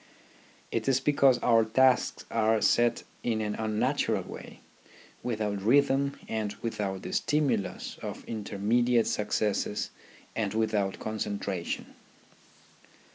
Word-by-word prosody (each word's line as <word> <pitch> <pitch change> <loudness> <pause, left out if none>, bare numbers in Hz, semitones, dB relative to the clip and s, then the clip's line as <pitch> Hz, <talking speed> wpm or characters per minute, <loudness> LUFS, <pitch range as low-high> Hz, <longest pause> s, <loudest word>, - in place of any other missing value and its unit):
It - - -2
is 135 -1 +4
because 140 -3 +4
our 115 -2 +5
tasks 130 +3 +2
are 110 0 +3
set 120 +2 +3 0.2
in 115 -2 0
an 105 -1 -1
unnatural 110 0 0
way, - - -10 0.6
without 105 -4 -2
rhythm 140 +4 +3
and 110 -2 -2
without 100 -4 -3
the - - -5
stimulus 150 -9 0
of - - -6
intermediate 115 +3 +1
successes 105 0 -1 0.4
and 110 -2 -1
without 105 -3 0
concentration. 100 -4 -3
110 Hz, 105 wpm, -29 LUFS, 105-120 Hz, 0.6 s, our